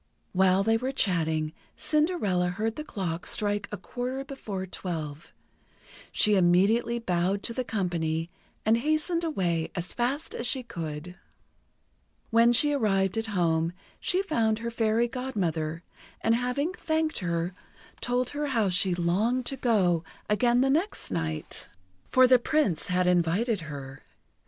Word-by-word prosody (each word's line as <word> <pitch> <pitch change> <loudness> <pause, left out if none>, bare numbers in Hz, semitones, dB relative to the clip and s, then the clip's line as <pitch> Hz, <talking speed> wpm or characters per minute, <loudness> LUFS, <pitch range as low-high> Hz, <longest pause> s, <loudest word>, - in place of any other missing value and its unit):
While 190 +1 +4
they 225 +2 +3
were 255 +3 -2
chatting, 160 - 0 0.2
Cinderella 300 - +1
heard 215 +5 -2
the 305 - -5
clock 180 - -4
strike 205 -1 +1
a 210 - -3
quarter 255 +4 -4
before 210 -9 -5
twelve. 160 -5 -5 0.8
She 210 - +4
immediately 200 +6 +3
bowed 190 -2 0
to 230 - -2
the 255 - -2
company, 170 -7 -2 0.3
and 220 +1 +4
hastened 310 +6 0
away 175 - 0
as 175 -1 -4
fast 265 +6 -1
as 235 - -3
she 255 +3 0
could. 165 -4 -6 1.1
When 230 +1 +6
she 290 +5 +4
arrived 195 -7 +1
at 225 0 -2
home, 165 -1 +1 0.3
she 375 +1 +1
found 225 - +1
her 235 +1 -4
Fairy 225 +1 +2
Godmother, 175 - -2 0.4
and 225 - +3
having 250 +8 0
thanked 315 -2 -1
her, 170 0 -1 0.5
told 245 0 -1
her 295 0 -2
how 225 -7 +1
she 180 0 +2
longed 210 +9 +1
to 270 - 0
go 190 -10 +2 0.2
again 240 +3 +3
the 270 0 +3
next 335 - 0
night, 80 -3 -3 0.4
for 255 0 +6
the 255 0 +6
Prince 270 - +1
had 180 0 +1
invited 180 +5 +2
her. 140 -3 -8
210 Hz, 140 wpm, -28 LUFS, 175-250 Hz, 1.1 s, When